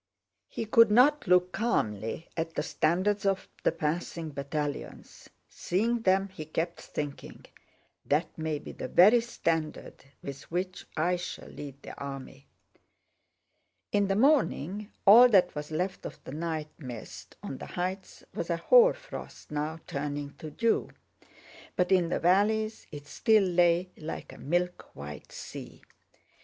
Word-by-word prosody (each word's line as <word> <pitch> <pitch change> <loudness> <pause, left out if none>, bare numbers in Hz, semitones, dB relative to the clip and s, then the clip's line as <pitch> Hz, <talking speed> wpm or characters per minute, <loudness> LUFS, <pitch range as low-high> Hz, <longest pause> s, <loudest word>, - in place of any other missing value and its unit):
He 225 - -4
could 230 +1 +6
not 255 +5 +5
look 180 0 +4
calmly 155 - -1
at 165 0 -3
the - - 0
standards 185 +6 +1
of 195 -1 0 0.2
the - - +4
passing 165 +1 -3
battalions. 145 +1 -5 0.2
Seeing 230 +6 -1
them 195 -1 +2
he 185 -5 -8
kept 165 +2 -3
thinking, 145 -2 -6 0.6
"That 155 +3 0
may 160 -1 -2
be - - -9
the - - -6
very 215 +7 +6
standard 165 -9 -3 0.2
with 140 0 -8
which 180 +2 -3
I 175 +3 +2
shall 175 - -7
lead 140 -1 -9
the - - -8
army." 135 0 -7 1.4
In 205 -1 +2
the 195 - +1
morning 210 - +2
all 235 +5 +9
that 185 -5 +4
was 150 0 -5
left 180 +5 -2
of - - -11
the - - -8
night 155 0 -3
mist 125 -6 -9
on - - -6
the - - -7
heights 185 +2 -4
was - - -4
a - - +1
hoar - - +6
frost - - -10
now 155 +2 -3
turning 145 0 -4
to 155 - -7
dew, 230 +9 +1 0.9
but 180 0 +1
in 180 -3 +4
the - - 0
valleys 215 +5 +2
it 145 -1 -8
still 215 +7 +3
lay 175 0 +3
like 155 +1 -7
a - - -13
milk 175 +4 -2
white 75 +1 -9
sea. - - -9
175 Hz, 145 wpm, -29 LUFS, 150-200 Hz, 1.4 s, all